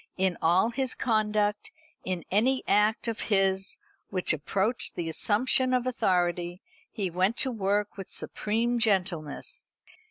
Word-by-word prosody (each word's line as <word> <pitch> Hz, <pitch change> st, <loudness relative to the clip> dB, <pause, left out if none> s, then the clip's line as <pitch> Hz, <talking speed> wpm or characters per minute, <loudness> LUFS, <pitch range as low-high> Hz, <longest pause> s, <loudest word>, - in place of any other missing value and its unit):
In 190 Hz, -2 st, +1 dB
all 180 Hz, +8 st, +3 dB
his 260 Hz, +1 st, -2 dB
conduct, 210 Hz, -2 st, 0 dB, 0.3 s
in 185 Hz, -3 st, -3 dB
any 255 Hz, +7 st, +2 dB
act 210 Hz, +3 st, +2 dB
of 230 Hz, -1 st, -3 dB
his 195 Hz, -1 st, +1 dB, 0.3 s
which 185 Hz, -3 st, +1 dB
approached 190 Hz, -, -1 dB
the 170 Hz, -, -3 dB
assumption 255 Hz, +8 st, +2 dB
of 250 Hz, -1 st, 0 dB
authority, 175 Hz, -6 st, 0 dB, 0.3 s
he 195 Hz, -4 st, -3 dB
went 185 Hz, +6 st, +1 dB
to 265 Hz, -3 st, +2 dB
work 205 Hz, -2 st, -1 dB
with 195 Hz, -, -7 dB
supreme 235 Hz, +3 st, -1 dB
gentleness. 195 Hz, -, -1 dB
205 Hz, 130 wpm, -28 LUFS, 185-230 Hz, 0.3 s, all